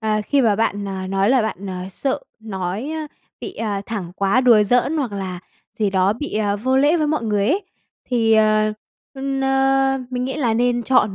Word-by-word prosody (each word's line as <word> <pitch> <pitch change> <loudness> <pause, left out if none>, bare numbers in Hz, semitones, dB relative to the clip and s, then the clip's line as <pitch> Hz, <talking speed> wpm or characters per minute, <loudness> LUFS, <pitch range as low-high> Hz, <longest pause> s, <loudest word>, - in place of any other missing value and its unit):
ờ, 215 -1 0
khi 285 - +3
mà 215 -4 +3
bạn, 205 -2 0
ờ, 190 -1 -4
nói 195 +3 +1
là 260 -2 +4
bạn, 210 -2 -4
ờ, 185 -1 -5
sợ 270 +7 -2 0.2
nói, 200 +4 -4
ơ, 315 -1 -4 0.3
bị, 380 - -7
ờ, 210 -3 -2
thẳng 190 -6 -5
quá, 200 +5 +2
đùa 235 -5 +6
giỡn 250 +8 +2
hoặc 260 -8 -2
là 190 -3 -5 0.4
gì 210 -2 +1
đó 190 +1 +2
bị, 295 +7 -6
ờ, 205 -1 0
vô 260 +5 0
lễ 290 +5 +4
với 305 -2 +1
mọi 300 -4 0
người 205 -2 +1
ấy, 380 +6 +1 0.4
thì, 230 -3 +1
ờ, 215 0 +3 0.4
ưm, 270 0 -3
na, 270 0 +2
mình 250 0 -2
nghĩ 265 - -3
là 240 -7 +1
nên 240 +1 +1
chọn 215 -5 +2
225 Hz, 210 wpm, -21 LUFS, 200-270 Hz, 0.4 s, đùa